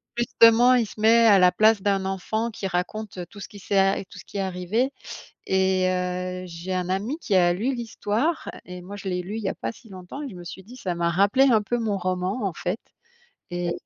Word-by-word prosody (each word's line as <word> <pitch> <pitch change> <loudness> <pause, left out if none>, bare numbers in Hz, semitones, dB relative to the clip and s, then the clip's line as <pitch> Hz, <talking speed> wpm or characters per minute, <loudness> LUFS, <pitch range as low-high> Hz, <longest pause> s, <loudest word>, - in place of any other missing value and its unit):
justement 240 +1 +5
il 240 -3 +2
se 210 - -12
met 230 +1 +6
à 205 -4 +7
la 180 0 +6
place 215 +2 +4
d'un 195 -1 +1
enfant 215 +4 -2
qui 200 -2 -4
raconte 190 +3 -3
tout 205 - -12
ce - - -7
qui 205 - -13
s'est 200 0 -1
a 195 0 +3
tout - - -13
ce - - -12
qui - - -8
est - - 0
arrivé, 190 +7 -1 0.6
et 190 -1 +2
heu, 180 0 -2
j'ai 175 +2 -5
un 180 -1 -2
ami 205 +10 -1
qui 200 - +1
a 175 -1 +4
lu 225 +9 -1
l'histoire, 235 +6 -2
et 180 0 -9
moi, 195 +3 -8
je 200 -1 -6
l'ai 180 -1 -1
lu 200 +5 -6
il 225 - -4
y 195 - -1
a - - -2
pas 115 - -4
si 225 - -18
longtemps, 185 +8 -9
et 285 - -5
je - - -11
me 175 - -9
suis 190 +2 -9
dit 240 +6 -13
ça 180 -8 -3
m'a 170 0 +1
rappelé 200 +9 +4
un 220 -3 +4
peu 240 +4 -1
mon 215 -3 -1
roman, 185 +5 -2
en 195 - -1
fait, 180 +7 -3 0.7
et 175 -1 -2
195 Hz, 245 wpm, -24 LUFS, 180-225 Hz, 0.7 s, à